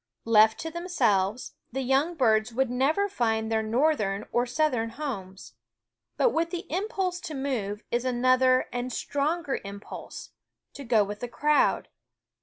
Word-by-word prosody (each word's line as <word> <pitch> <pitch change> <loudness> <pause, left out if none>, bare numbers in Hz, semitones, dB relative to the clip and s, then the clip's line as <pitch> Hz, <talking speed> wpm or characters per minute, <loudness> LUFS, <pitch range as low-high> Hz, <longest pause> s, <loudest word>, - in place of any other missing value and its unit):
Left 220 -1 +5
to 325 - -5
themselves, 245 - 0 0.2
the 265 +2 -2
young 275 +7 +1
birds 220 -5 +2
would 255 +1 0
never 295 +11 +2
find 225 - -1
their 220 0 +2
northern 220 -4 +1
or 245 +1 +1
southern 250 -4 0
homes; 225 -8 -6 0.6
but - - +3
with 335 +1 0
the 355 +2 -5
impulse 375 -2 -1
to 335 -4 -7
move 230 -7 -3
is 240 +1 0
another 255 +1 +3
and 245 +1 -3
stronger 290 +4 -1
impulse, 200 +1 -9 0.4
to 280 - -8
go 230 -4 +3
with 205 +1 -6
the 245 - -4
crowd. 295 +5 +2
255 Hz, 145 wpm, -27 LUFS, 220-305 Hz, 0.6 s, Left